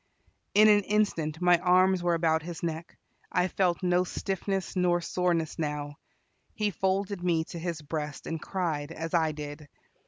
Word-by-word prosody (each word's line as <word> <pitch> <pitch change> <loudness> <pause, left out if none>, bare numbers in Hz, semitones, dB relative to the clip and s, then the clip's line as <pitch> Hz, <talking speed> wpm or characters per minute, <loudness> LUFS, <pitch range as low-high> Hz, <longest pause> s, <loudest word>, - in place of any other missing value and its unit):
In 215 +1 +8
an 205 -1 +6
instant 170 -7 0
my 175 -1 +5
arms 185 +1 +4
were 175 -1 +2
about 160 -1 +2
his 170 +1 -7
neck 165 0 -4 0.3
I 180 0 +2
felt 185 -1 0
no 180 0 +3
stiffness 195 +1 -3
nor 180 -1 +2
soreness 170 -2 -1
now. 150 -1 -3 0.6
He 210 -2 0
folded 190 0 -1
me 170 -3 +2
to 170 - -6
his 165 -2 -4
breast, 150 -1 -5
and 165 -1 -4
cried, 165 -6 -2
as 165 0 -5
I 160 -2 +3
did. 150 0 -8
175 Hz, 160 wpm, -28 LUFS, 160-185 Hz, 0.6 s, In